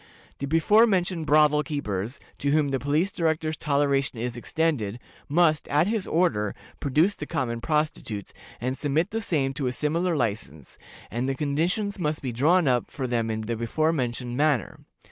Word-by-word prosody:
The 140 - -3
before 205 +10 +5
mentioned 180 -5 0
brothel 150 0 +5
keepers, 120 - -3 0.2
to 140 - 0
whom 150 0 +3
the 135 -1 0
Police 150 +8 +1
Director's 160 -2 0
toleration 140 -3 +1
is 120 +1 -3
extended, 120 -5 -1 0.3
must, 155 0 +3
at 150 +3 +3
his 215 -1 -1
order, 160 - +1 0.2
produce 155 +8 +2
the 150 -7 -7
common 115 -2 -2
prostitutes, 150 -10 -2 0.3
and 130 +2 -2
submit 155 +6 0
the 225 +1 -2
same 140 -9 0
to 135 -1 -2
a - - 0
similar 165 +6 0
license, 100 - -3 0.3
and 120 +4 -1
the 135 - -1
conditions 170 +9 -1
must 150 -3 -2
be 130 - -2
drawn 155 +8 +3
up 125 -2 +1
for 135 - -4
them 120 -2 0
in 110 0 -2
the 115 +2 -3
before 155 +8 0
mentioned 125 -3 -2
manner. 145 -5 +1
145 Hz, 170 wpm, -26 LUFS, 125-160 Hz, 0.3 s, before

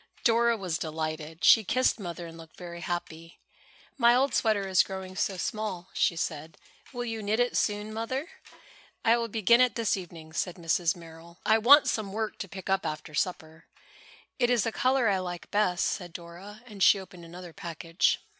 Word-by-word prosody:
Dora 235 0 +3
was 180 -5 -3
delighted. 155 0 -5
She 225 - +7
kissed 255 +3 +1
Mother 175 -2 -6
and 165 -1 -10
looked 165 -1 -14
very 170 -1 -8
happy. 165 -1 -5 0.6
"My 235 0 +6
old 270 +2 +2
sweater 210 -3 +1
is 190 -1 +5
growing 190 -1 -6
so 195 0 -1
small," 190 -2 -4
she 170 - +2
said. 160 -1 -4 0.3
"Will 245 -2 -4
you 225 -2 -4
knit 210 +2 0
it 245 0 +1
soon, 210 0 -1
Mother?" 260 +7 -3 0.8
"I 230 - +6
will 235 -1 -1
begin 230 +2 +4
it 250 -4 +3
this 230 -2 +1
evening," 165 -4 -9
said 175 +1 -2
Mrs. 170 -1 0
Merrill. 170 0 -13
"I 220 +1 +4
want 275 +6 +7
some 205 -3 -2
work 220 0 -3
to 195 - -5
pick 190 0 -9
up 195 0 +1
after 155 +1 -5
supper." 160 -1 -3 0.7
"It 245 -1 +3
is 245 -3 +3
the 225 - -1
color 255 +1 +2
I 195 -2 +2
like 175 -1 -6
best," 185 -4 +1
said 175 -3 -3
Dora, 190 +5 -10
and 210 -5 -11
she 200 - +6
opened 180 -2 -12
another 175 0 -10
package. 165 +1 0
190 Hz, 185 wpm, -28 LUFS, 170-225 Hz, 0.8 s, She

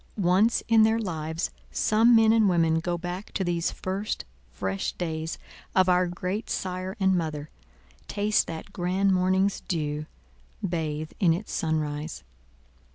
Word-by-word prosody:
Once 195 +4 +3
in 225 -1 +5
their 220 +1 +4
lives 160 -6 -3 0.2
some 225 +3 +4
men 225 -1 +6
and 220 -3 +4
women 165 -2 +3
go 175 +1 -2
back 180 +3 -6
to 195 - 0
these 170 -2 0
first 195 +3 -3 0.3
fresh 95 +8 -2
days 160 -2 -3 0.4
of 185 0 +5
our 180 0 +4
great 185 +5 -4
Sire 185 +2 -3
and 190 -1 +3
Mother—taste 150 - -3
that 165 +5 -7
grand 190 +2 +1
morning's 190 +2 +2
dew—bathe 150 - -4
in 175 -5 +4
its 205 +5 -7
sunrise. 155 -1 -2
175 Hz, 130 wpm, -27 LUFS, 160-195 Hz, 0.4 s, men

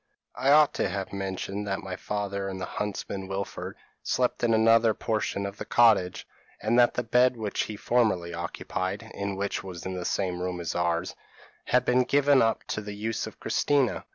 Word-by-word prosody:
I 130 +3 0
ought 150 +1 +6
to - - 0
have 100 -1 -4
mentioned 95 +1 -4
that 95 0 -2
my 95 -1 -5
father 100 -1 -3
and 95 -1 -5
the 95 - -3
huntsman 100 -1 -4
Wilfred, 95 0 -5 0.3
slept 125 -1 0
in 120 - +3
another 115 0 +5
portion 105 -3 -1
of 100 +1 -6
the - - -5
cottage, 110 -7 +3 0.3
and 115 +3 +2
that 120 - +5
the 125 - 0
bed 125 +2 +3
which 105 -2 -2
he 110 - -6
formerly 105 -7 +1
occupied, 95 +5 -4
and 100 -1 -3
which 100 +1 -2
was 90 -3 -8
in 95 - -3
the 90 -1 -4
same 90 -1 -1
room 90 -1 -3
as 85 - -3
ours, 85 0 -1 0.5
had 125 0 +2
been 125 +1 +4
given 140 +1 +4
up 115 0 +1
to 110 - -2
the 105 -1 -7
use 110 +2 -3
of - - -11
Christina. 140 -4 +1
100 Hz, 190 wpm, -27 LUFS, 95-115 Hz, 0.5 s, ought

